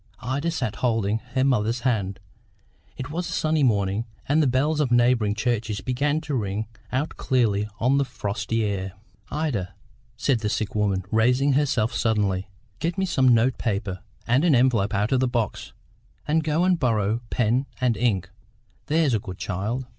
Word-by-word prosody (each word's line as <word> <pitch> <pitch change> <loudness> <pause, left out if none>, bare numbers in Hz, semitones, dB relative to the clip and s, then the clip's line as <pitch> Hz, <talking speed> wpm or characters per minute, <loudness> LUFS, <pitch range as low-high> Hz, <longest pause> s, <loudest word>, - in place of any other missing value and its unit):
Ida 140 +6 -1
sat 110 -10 -2
holding 110 -3 +1 0.2
her 130 - +3
mother's 120 -3 +1
hand. 105 -7 -1 0.8
It 130 +2 -6
was 175 +2 -3
a - - -4
sunny 155 -1 +1
morning, 105 -3 +1 0.2
and 150 +3 +3
the 150 - +3
bells 145 +5 +1
of 145 -4 +2
neighbouring 120 -3 +3
churches 110 -2 -1
began 145 +4 0
to 150 -2 -5
ring 105 -3 -1 0.3
out 135 +5 -2
clearly 110 -6 +1
on 130 +4 +3
the - - +3
frosty 110 -3 -2
air. 95 -2 -3 0.4
"Ida," 140 - -2 0.4
said 130 -5 +1
the 105 -1 -1
sick 105 0 -2
woman, 100 -3 0
raising 125 +5 +3
herself 130 -5 +1
suddenly, 100 -5 0 0.3
"get 170 +3 -2
me 190 - +1
some 135 -8 +2
note 120 +1 +3
paper 100 -4 -2 0.3
and 125 +5 +2
an 165 -5 +4
envelope 115 -5 +2
out 105 +4 0
of 130 - +3
the 130 - +2
box; 120 -4 -2 0.6
and 160 +2 +2
go 155 +2 +1
and 180 -2 +3
borrow 110 -2 +1
pen 125 +3 +1
and 125 -3 +2
ink, 100 -7 0 0.6
there's 155 -3 +2
a 110 - +2
good 95 -2 -8
child." 100 +7 -3
120 Hz, 170 wpm, -24 LUFS, 105-135 Hz, 0.8 s, an